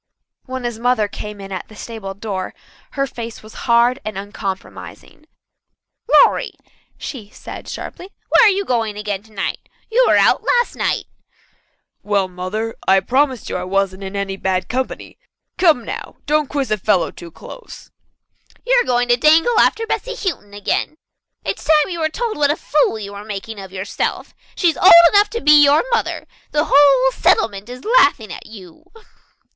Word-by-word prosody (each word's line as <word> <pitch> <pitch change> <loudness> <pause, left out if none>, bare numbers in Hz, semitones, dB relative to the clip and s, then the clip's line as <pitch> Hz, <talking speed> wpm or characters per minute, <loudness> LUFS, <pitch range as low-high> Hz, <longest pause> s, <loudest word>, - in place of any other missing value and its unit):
When 260 -1 -6
his 240 -2 -4
mother 245 -3 +1
came 210 0 -8
in 195 0 -9
at 185 - -5
the 215 - -15
stable 210 -3 -7
door 195 -2 -5 0.4
her 275 -1 0
face 235 -4 -8
was 215 - -13 0.2
hard 240 +3 +4
and 215 -2 -5
uncompromising. 200 +8 -8 0.8
"Lawrie," - - +4 0.4
she 220 -8 -8
said - - -10
sharply, 370 - -8 0.2
"where - - +6
are - - +5
you 395 +1 -2
going 225 - -1
again 205 -2 -3
tonight? 210 -2 -5 0.3
You - - +4
were - - +4
out - - +3
last 485 0 +1
night." - - -1 1.0
"Well, 200 -2 0
Mother, 185 +5 -4
I 190 0 +5
promise 260 +4 0
you - - -3
I 180 - -4
wasn't 195 0 -1
in 190 +1 -7
any 195 -1 -3
bad 185 -1 -1
company. 255 +1 -4 0.4
Come 320 -10 +3
now, - - -7
don't 300 -1 +1
quiz 280 -4 -2
a 215 - +1
fellow 195 -2 +1
too 170 - -11
close." 475 - -12 0.7
"You - - +1
are - - -5
going 245 -1 +1
to 240 - +4
dangle 325 - +4
after 450 - +2
Bessy - - -3
Houghton 260 - -5
again. 205 +8 -2 0.5
It's - - -3
time 305 +1 +3
you 340 - -4
were 315 -1 0
told 460 +6 -3
what 290 -1 +2
a 295 - +2
fool 295 -8 0
you 200 -2 -7
were 200 0 -8
making 210 +1 -7
of 190 -1 -10
yourself. 190 +1 -4 0.2
She's 340 -4 +1
old 375 - +7 0.2
enough 410 +1 +5
to 465 +1 -4
be 300 0 +7
your 285 +2 +4
mother. 465 - -1 0.3
The 300 +1 0
whole 275 -2 +5
settlement 205 -3 +1
is 250 +1 -10
laughing 285 - +3
at - - -10
you." 195 - -14
230 Hz, 175 wpm, -19 LUFS, 200-295 Hz, 1.0 s, old